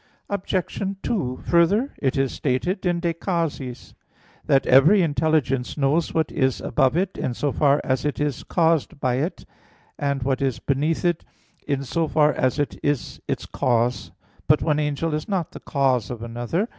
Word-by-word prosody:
Obj. 190 -2 -2 0.2
2: 130 - -2
Further, 200 - +3
it 135 -2 0
is 135 -1 +1
stated 175 +9 -1
in 175 -1 0
De 170 -1 0
Causis 165 -8 -3 0.5
that 135 - +3
"every 160 +10 +6
intelligence 145 -5 0
knows 145 +4 +1
what 160 -1 0
is 130 -4 +1
above 130 +6 +1
it, 190 +1 -1
in 120 - -2
so 145 +2 -1
far 145 0 +3
as 130 -1 0
it 150 - -2
is 145 -3 -1
caused 165 -4 +1
by 125 -2 0
it; 155 +7 -3 0.5
and 140 -3 -1
what 135 +1 0
is 130 -4 0
beneath 145 +7 -1
it, 175 -2 +1 0.4
in 140 -2 -1
so 165 +4 -1
far 150 -1 +3
as 130 +2 0
it 145 -1 -2
is 145 -2 -2
its - - -2
cause." 120 0 0 0.4
But 150 +1 +4
one 150 -1 +1
angel 150 +2 -1
is 155 +4 -3
not 180 -4 -1
the - - -9
cause 130 -6 0
of 120 -2 -6
another. 120 - -2
145 Hz, 170 wpm, -23 LUFS, 130-165 Hz, 0.5 s, every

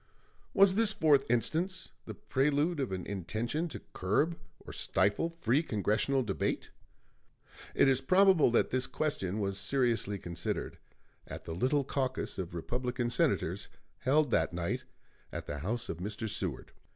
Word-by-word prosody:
Was 195 -1 +7
this 220 +1 +3
fourth 145 -7 +3
instance 165 +10 0
the - - -7
prelude 145 +4 +1
of 130 -7 -1
an 90 -2 -4
intention 110 - -2
to - - -8
curb 145 - +1 0.3
or - - -8
stifle 100 - +1
free 155 -5 +1
Congressional 115 - +1
debate? 100 -4 -2 1.0
It - - +5
is 135 -1 +3
probable 185 +1 +5
that 120 - +2
this 130 +1 0
question 130 -9 -2
was 100 -1 -1
seriously 115 -2 +1
considered 85 -2 -4 0.5
at - - -7
the 80 - -5
little 130 - +1
caucus 130 -5 -2
of 85 -2 -5
Republican 120 +6 -2
Senators 120 - +1 0.3
held 145 0 +2
that 80 -3 +2
night 85 0 -2 0.5
at - - -5
the 75 - -5
house 110 - -1
of - - -4
Mr. 105 +5 -4
Seward. - - -3
125 Hz, 145 wpm, -31 LUFS, 100-150 Hz, 1.0 s, Was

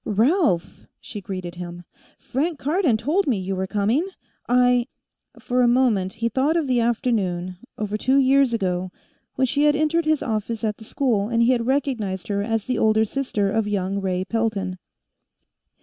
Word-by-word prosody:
"Ralph!" 220 - +1
she 210 - -8
greeted 185 -3 -6
him. 175 0 -8 0.3
"Frank 305 +5 -2
Cardon 295 - +1
told 310 - 0
me 245 -6 +2
you 190 0 -3
were 190 0 -2
coming. 215 - +1 0.4
I 245 0 +3 0.2
" - - -25
For 250 0 0
a 245 - +4
moment, 235 -7 +2
he 230 +1 -1
thought 270 +8 +1
of 325 - 0
the 255 -2 +1
afternoon, 200 -7 -1 0.2
over 210 0 -2
two 260 +4 +2
years 270 -1 +4
ago, 185 -4 -1 0.5
when 260 - +2
she 285 +3 +1
had 295 0 +4
entered 310 +2 +1
his 310 -1 +1
office 220 +1 -3
at 215 -2 -1
the 220 - -13
school, 220 -5 0
and 235 -1 +2
he 240 - +4
had 235 -2 0
recognized 235 -10 -1
her 200 -1 0
as 225 0 -1
the 255 - -1
older 220 0 +3
sister 215 -5 -1
of 220 0 0
young 200 -1 -1
Ray 185 -1 -1
Pelton. 200 -4 -2
225 Hz, 180 wpm, -23 LUFS, 195-260 Hz, 0.5 s, a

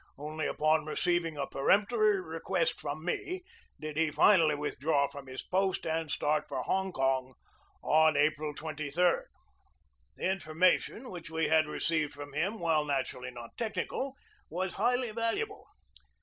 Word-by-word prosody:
Only 155 +2 -3
upon 155 0 +2
receiving 170 -1 0
a 140 - -1
peremptory 210 - +3
request 165 -1 -1
from 150 +2 -5
me 360 - -2 0.4
did 155 -1 -6
he 160 -1 +3
finally 155 0 +5
withdraw 145 0 +1
from 140 -1 -10
his 130 0 -6
post 190 0 0
and 160 -1 -1
start 150 +1 +1
for 130 -2 -3
Hong 190 +5 0
Kong 130 -3 0 0.5
on 155 -1 +4
April 150 0 +1
23d. 155 - 0 0.9
The 185 - 0
information 185 +7 +1
which 170 -3 -7
we 160 -1 0
had 160 -1 +4
received 155 -1 0
from 145 -1 -9
him, 190 +9 -1
while 160 -3 +2
naturally 135 -3 -2
not 120 -2 -10
technical, 235 +5 -2 0.3
was 185 +3 -2
highly 245 -1 +1
valuable. 230 +1 -2
160 Hz, 140 wpm, -31 LUFS, 150-185 Hz, 0.9 s, finally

